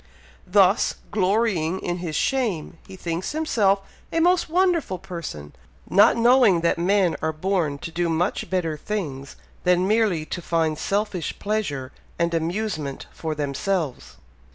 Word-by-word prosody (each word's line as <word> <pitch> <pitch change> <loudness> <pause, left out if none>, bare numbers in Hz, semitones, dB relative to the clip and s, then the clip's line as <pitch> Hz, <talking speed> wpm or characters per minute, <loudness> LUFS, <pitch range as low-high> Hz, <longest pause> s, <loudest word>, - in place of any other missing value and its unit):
Thus, 195 +2 +4 0.2
'glorying 190 -4 +1
in 175 0 -3
his 170 -3 -4
shame,' 200 - -1
he 190 - -10
thinks 175 - -3
himself 210 -11 +2 0.3
a 330 - +1
most 350 0 +3
wonderful 340 - +1
person, 165 - -7 0.3
not 205 +4 +5
knowing 235 -6 +5
that 170 0 +1
men 185 0 +2
are 160 - 0
born 160 -3 -1
to 165 - -7
do 170 +1 -1
much 170 +4 -1
better 175 -4 -1
things 145 -8 -5 0.3
than 180 +1 +3
merely 210 -7 +2
to 175 - -5
find 160 -2 0
selfish 200 -2 -2
pleasure 150 -12 -2 0.3
and 170 0 0
amusement 165 -4 -2
for 160 -1 -4
themselves. 150 +1 -2
180 Hz, 135 wpm, -24 LUFS, 160-210 Hz, 0.3 s, not